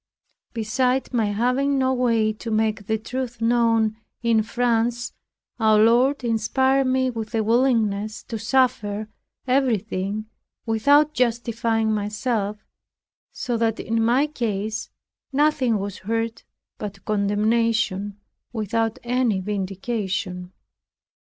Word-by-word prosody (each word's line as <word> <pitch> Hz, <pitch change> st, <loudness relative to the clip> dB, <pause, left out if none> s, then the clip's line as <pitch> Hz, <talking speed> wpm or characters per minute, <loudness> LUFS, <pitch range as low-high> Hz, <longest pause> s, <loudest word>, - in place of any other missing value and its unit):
Beside 250 Hz, +4 st, 0 dB
my 230 Hz, -3 st, +2 dB
having 250 Hz, +7 st, +1 dB
no 260 Hz, 0 st, +2 dB
way 230 Hz, -4 st, +2 dB
to 230 Hz, +2 st, -7 dB
make 215 Hz, -2 st, 0 dB
the 220 Hz, -, +1 dB
truth 245 Hz, +2 st, -5 dB
known 230 Hz, -2 st, +2 dB, 0.3 s
in 230 Hz, -2 st, +3 dB
France, 235 Hz, +1 st, 0 dB, 0.5 s
our 220 Hz, -1 st, +4 dB
Lord 245 Hz, +6 st, +4 dB
inspired 260 Hz, +4 st, +2 dB
me 260 Hz, 0 st, +1 dB
with 225 Hz, -1 st, -5 dB
a 220 Hz, -, +2 dB
willingness 220 Hz, -3 st, +1 dB
to 225 Hz, -, -6 dB
suffer 220 Hz, -3 st, +1 dB, 0.4 s
everything, 215 Hz, -6 st, 0 dB, 0.4 s
without 285 Hz, +7 st, +4 dB
justifying 230 Hz, -2 st, 0 dB
myself; 210 Hz, 0 st, -1 dB, 0.7 s
so 240 Hz, -2 st, -2 dB
that 225 Hz, -1 st, 0 dB
in 225 Hz, 0 st, 0 dB
my 245 Hz, +5 st, +3 dB
case 220 Hz, -6 st, -3 dB, 0.4 s
nothing 275 Hz, -5 st, +2 dB
was 200 Hz, -1 st, -5 dB
heard 225 Hz, +3 st, -2 dB, 0.4 s
but 200 Hz, -2 st, -7 dB
condemnation, 210 Hz, 0 st, +1 dB, 0.3 s
without 225 Hz, 0 st, -1 dB
any 240 Hz, -4 st, +1 dB
vindication. 190 Hz, -2 st, -3 dB
225 Hz, 105 wpm, -23 LUFS, 215-245 Hz, 0.7 s, our